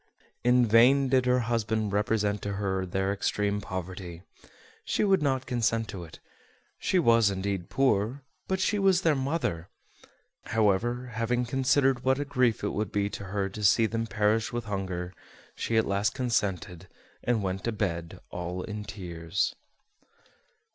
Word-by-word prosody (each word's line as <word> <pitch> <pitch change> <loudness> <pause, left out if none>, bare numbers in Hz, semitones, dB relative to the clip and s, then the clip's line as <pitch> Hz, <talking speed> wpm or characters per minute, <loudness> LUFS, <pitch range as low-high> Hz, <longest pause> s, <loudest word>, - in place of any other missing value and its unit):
In 125 0 +5
vain 125 +5 +5
did 130 -1 +3
her 125 0 +3
husband 110 -3 -1
represent 105 0 +1
to 100 - -3
her 95 -2 -2
their 95 +2 0
extreme 100 0 -1
poverty: 90 -2 -6 0.6
she - - 0
would 195 -4 +3
not 135 -2 0
consent 115 -3 0
to 95 -4 -6
it; 80 - -12 0.6
she 190 - +1
was 115 - +5
indeed 95 -2 -3
poor, 130 0 +1 0.2
but 190 0 0
she 205 +2 +1
was 190 -2 +3
their 160 - +4
mother. 135 - -2 0.8
However, 115 +4 +1
having 120 +2 0
considered 135 0 +2
what 130 0 +3
a 145 - -1
grief 125 -6 +1
it 105 - +1
would 105 -1 -2
be 100 0 0
to 100 - -6
her 100 0 -1
to 105 +2 -7
see 110 +3 +5
them 115 +1 -2
perish 110 +2 +1
with 120 -1 -3
hunger, 95 -3 -4 0.4
she 115 - -1
at 110 - +3
last 100 +1 0
consented, 95 -8 -2 0.4
and 115 -4 +1
went 95 0 -2
to 115 - 0
bed 85 -6 -3
all 90 +1 -4
in 105 -1 -5
tears. 90 -4 -3
110 Hz, 155 wpm, -28 LUFS, 95-125 Hz, 0.8 s, In